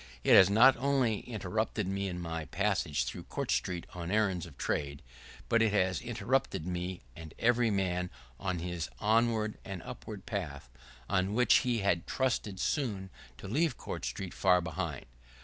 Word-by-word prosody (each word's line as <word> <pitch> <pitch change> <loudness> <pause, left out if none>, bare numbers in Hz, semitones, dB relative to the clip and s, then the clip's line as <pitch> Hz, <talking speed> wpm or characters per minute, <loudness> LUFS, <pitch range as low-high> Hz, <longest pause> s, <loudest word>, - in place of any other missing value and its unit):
It - - +5
has 95 - +9
not 120 +6 +7
only 130 -4 +1
interrupted 110 0 -2
me 100 +1 -1
in 90 -2 -4
my 80 -2 -4
passage 90 -9 0
through - - -6
Court - - -3
Street 90 -2 -1
on 85 -1 -5
errands 95 -5 +1
of 70 -5 -15
trade, 70 -1 -2 0.4
but 115 - +3
it 110 -2 +3
has 95 -4 +2
interrupted 80 - -1
me 90 -1 -4
and 80 -1 -10
every 120 0 +3
man 90 -3 0 0.3
on 90 +4 -2
his 85 -2 -4
onward 110 - +1
and 95 -4 -6
upward - - -8
path, 70 -4 -5 0.4
on 95 +1 +1
which 125 +1 +6
he 120 -4 0
had 85 -4 +1
trusted 115 -7 -1
soon 100 -11 -1 0.3
to - - -9
leave 145 - +1
Court - - -6
Street 95 -2 -4
far 90 -2 +4
behind. 80 -3 -4
95 Hz, 165 wpm, -31 LUFS, 90-110 Hz, 0.4 s, has